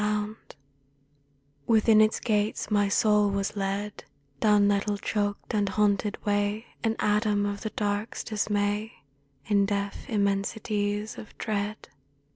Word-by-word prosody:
77 210 0 +1
A - - +1
DREAM 210 +1 -4
OF - - -34
FEAR - - -15 1.2
Within 220 0 +5
its 215 0 +3
gates 210 -1 -1
my 205 -1 +3
soul 210 0 +3
was 200 +1 -2
led, 200 +1 -3 0.4
Down 210 +1 +4
nettle 205 0 +1
choked 205 +1 -2
and 205 -2 +1
haunted 210 0 +1
way 205 +2 0 0.2
An 225 -1 +1
atom 210 -1 +1
of 205 0 -3
the 220 - -3
Dark's 205 +1 -2
dismay, 210 0 -1 0.5
In 200 -1 +3
deaf 200 +4 -3
immensities 205 0 -1
of 215 - -12
dread. 210 0 -3
205 Hz, 140 wpm, -27 LUFS, 205-215 Hz, 1.2 s, Within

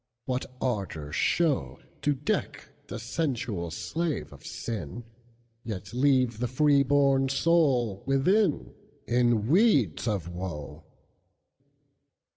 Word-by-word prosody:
What 130 0 -2
ardor 95 - -3
show, 155 - +1 0.2
To 145 -1 +1
deck 145 -1 -3 0.2
the - - -5
sensual 120 - -2
slave 160 - -3
of - - -15
sin, 115 0 -5 0.6
Yet 105 -2 -6
leave 130 -3 +2
the 125 - 0
freeborn 140 0 +3
soul 135 - +2
within, 160 +7 +2 0.3
In 120 -3 +2
weeds 145 - +3
of 100 -7 -1
woe! 85 -4 -6
125 Hz, 95 wpm, -28 LUFS, 105-145 Hz, 0.6 s, freeborn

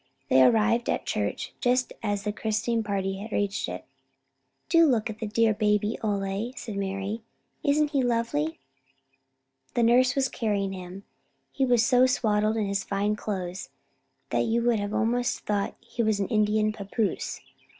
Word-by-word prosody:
They 130 - +6
arrived 225 - +4
at - - +1
the - - -29
church - - -2
just 250 0 +1
as 205 -3 -1
the 210 0 -2
christening 220 +2 -1
party 195 -1 -2
reached 205 - -1
it. 90 +1 -6 0.8
"Do 335 0 +5
look 235 -4 +1
at 215 - -11
the 220 - -3
dear 220 +1 +3
baby, 210 0 +1
Ole," 200 +3 -2
said 215 - -6
Mari. 195 +2 -3 0.4
"Isn't 295 0 +2
he 280 -3 +2
lovely?" 230 - 0 1.2
The 240 - +3
nurse 250 +2 +4
was 270 -1 +2
carrying 200 -5 -1
him. 185 +1 -8 0.5
He 265 -1 0
was 240 -2 +4
so 250 +1 +5
swaddled 215 -4 +1
in 215 - 0
his 200 0 -1
fine 205 +1 0
clothes 190 -3 -4 0.6
that - - +2
you 230 +1 +1
would 235 -2 +2
have 205 +1 -3
almost 240 +2 0
thought 205 -1 -1
he 235 - -4
was 215 -2 +1
an 195 - -1
Indian 215 -1 +2
pappoose. 205 -1 -2
215 Hz, 160 wpm, -27 LUFS, 200-235 Hz, 1.2 s, They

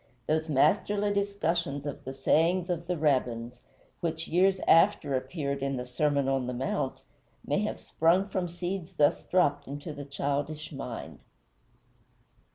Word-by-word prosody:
Those 160 +1 0
masterly 205 +8 +2
discussions 170 -8 -1
of 145 - -6
the 130 - -5
sayings 175 +6 +2
of 170 -1 -3
the 180 -1 -1
Rabbins, 125 -5 0 0.4
which 165 -1 -3
years 190 +2 +3
after 165 -4 +5
appeared 140 +1 -2
in 135 -1 -1
the 125 - -4
Sermon 140 +2 +1
on 135 -2 0
the 125 - -3
Mount, 130 +1 -2 0.4
may 145 - +1
have 210 - -2
sprung 175 +5 +2
from 185 -3 -2
seeds 175 +1 -4
thus 145 -4 +3
dropped 145 -6 +1
into 145 +3 -6
the 145 - -7
childish 145 +2 -3
mind. 130 -5 -7
155 Hz, 145 wpm, -29 LUFS, 140-175 Hz, 0.4 s, after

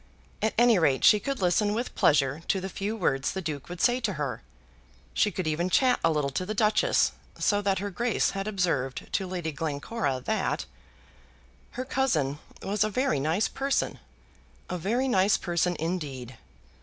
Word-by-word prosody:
At 220 - 0
any 235 -4 +5
rate 140 -5 +2
she 210 - +7
could 270 -1 -3
listen 205 +4 +2
with 240 +3 -3
pleasure 140 0 +2
to 195 - +1
the 190 +1 -5
few 200 +3 -3
words 145 -9 0
the 190 - -3
Duke 150 -3 -5
would 175 -1 -7
say 245 +5 +3
to 225 -5 -1
her. 140 -7 -3 0.7
She 210 - +3
could 185 -2 -4
even 160 +3 0
chat 250 +5 +3
a 165 - +4
little 150 -3 0
to 185 - -2
the 215 +4 -4
Duchess, 215 0 +3 0.3
so 205 -2 +2
that 195 -1 +1
her 205 +2 -3
Grace 235 +4 +1
had 195 +1 -4
observed 170 -11 -1
to 190 - 0
Lady 175 -3 -3
Glencora 145 - -2
that 65 - -1 1.1
"her 255 - -2
cousin 155 - 0 0.2
was 205 +1 +1
a 215 - 0
very 255 - 0
nice 160 +9 +1
person, 275 0 -1 0.7
a 180 - -1
very 235 +10 0
nice 200 -4 +3
person 175 0 0
indeed. 145 -7 -4
185 Hz, 175 wpm, -27 LUFS, 150-215 Hz, 1.1 s, she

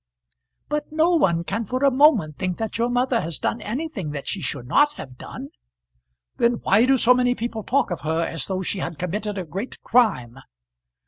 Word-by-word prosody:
"But 300 0 -3
no 320 +3 +3
one 175 - +2
can 200 +6 -2
for 255 +6 -1
a 275 - +5
moment 250 - +3
think 185 -1 -2
that 225 0 -4
your 235 +1 +1
mother 245 -1 +1
has 165 -2 -4
done 230 - -2
anything 225 - -4
that 140 -2 -6
she 195 - -3
should 135 -3 -4
not 290 - +3
have 130 - -10
done." - - -8 0.9
"Then 235 +1 +3
why 210 +5 +4
do 270 0 +4
so 250 0 +5
many 250 0 +2
people 230 -1 -4
talk 255 -1 0
of 175 - -3
her 160 +1 0
as 165 -5 -3
though 190 -1 -2
she 190 - -2
had 165 -2 -4
committed 205 +4 -3
a 185 - -3
great 195 - -6
crime? 135 - +2
215 Hz, 200 wpm, -23 LUFS, 170-250 Hz, 0.9 s, a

